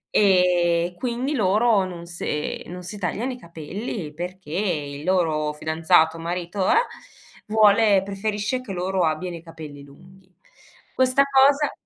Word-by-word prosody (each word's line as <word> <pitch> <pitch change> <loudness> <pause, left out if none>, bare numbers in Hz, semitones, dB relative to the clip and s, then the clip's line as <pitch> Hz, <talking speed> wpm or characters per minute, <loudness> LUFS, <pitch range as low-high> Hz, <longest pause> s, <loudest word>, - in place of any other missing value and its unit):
e 180 -3 +3
quindi 250 +5 -2
loro 215 -2 +3
non 175 -2 -7
se 170 -3 -4
non 180 +1 -8
si 195 +4 -7
tagliano 205 +7 -2
i - - -9
capelli 170 -1 -6
perché 180 +1 -7
il 150 -6 -2
loro 160 -4 +1
fidanzato, 160 +1 +2
marito, 175 +3 -2
eh, - - +4 0.7
vuole 210 -1 +5
preferisce 210 +4 -2
che 245 -5 -9
loro 185 0 -1
abbiano 170 +2 -1
i 165 - -9
capelli 155 -4 -10
lunghi. 180 +6 -18 0.6
Questa 260 +1 +3
cosa 275 +1 +4
185 Hz, 130 wpm, -23 LUFS, 165-210 Hz, 0.7 s, vuole